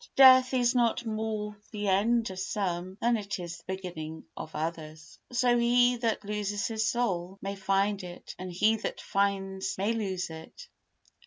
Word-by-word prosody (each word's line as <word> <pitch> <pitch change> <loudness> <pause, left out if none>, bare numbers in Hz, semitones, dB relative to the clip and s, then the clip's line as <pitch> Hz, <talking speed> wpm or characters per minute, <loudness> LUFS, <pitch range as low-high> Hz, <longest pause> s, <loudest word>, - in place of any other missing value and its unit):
Death 260 -1 +8
is 245 -1 +3
not 240 -1 +2
more 215 -1 -3
the 210 -2 -4
end 220 +3 +2
of 185 - -7
some 185 -2 -2
than 235 +1 +3
it 200 -2 -3
is 170 -2 -6
the - - -22
beginning 160 -4 -7
of - - -6
others. 155 -1 -5
So 245 0 +3
he 245 +1 +4
that 225 -3 -1
loses 205 -1 -2
his 220 -1 0
soul 190 -6 -1
may 195 +1 -4
find 195 +1 +1
it, 175 -1 -9
and 185 0 -5
he 215 +5 +3
that - - -4
finds 195 -1 -1
may 200 +4 +1
lose 190 -6 -2
it. 160 - -11
200 Hz, 165 wpm, -29 LUFS, 185-230 Hz, -, Death